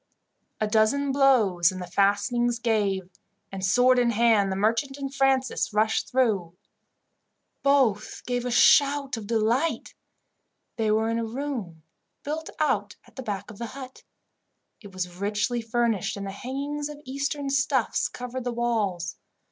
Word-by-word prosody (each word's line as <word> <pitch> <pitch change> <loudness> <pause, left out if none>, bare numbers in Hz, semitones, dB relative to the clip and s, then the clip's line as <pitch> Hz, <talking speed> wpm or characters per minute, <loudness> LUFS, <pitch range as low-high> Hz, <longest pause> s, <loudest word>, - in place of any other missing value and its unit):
A 215 - +1
dozen 225 +6 +2
blows 220 -11 +4
and 185 - -7
the 180 - -5
fastenings 205 +6 +1
gave, 205 -5 0 0.4
and, 195 -1 -6
sword 250 +6 +4
in 240 -1 +3
hand, 225 -3 +3
the - - -1
merchant 230 +7 0
and 275 -1 -5
Francis 270 -3 +1
rushed 220 +1 +1
through. 205 -10 0 1.1
Both 260 -7 +1
gave 245 -1 -1
a 250 - -2
shout 280 +2 +4
of 220 -3 -7
delight. 235 +8 0 0.8
They 225 -2 0
were 220 +1 +2
in 230 - 0
a - - -1
room 225 - -5 0.4
built 315 +2 -4
out 205 -9 0
at - - -22
the 260 - -6
back 205 -4 -5
of 205 - -14
the 235 - -4
hut. 260 -1 -9 0.8
It 205 -3 -12
was 180 -1 -5
richly 210 +5 -1
furnished, 225 -4 -1
and 200 0 -5
hangings 280 +8 -4
of 295 -1 -9
Eastern 280 +1 -3
stuffs 275 -3 +1
covered 250 +1 -6
the 245 - -2
walls. 215 -8 -1
235 Hz, 150 wpm, -26 LUFS, 205-265 Hz, 1.1 s, blows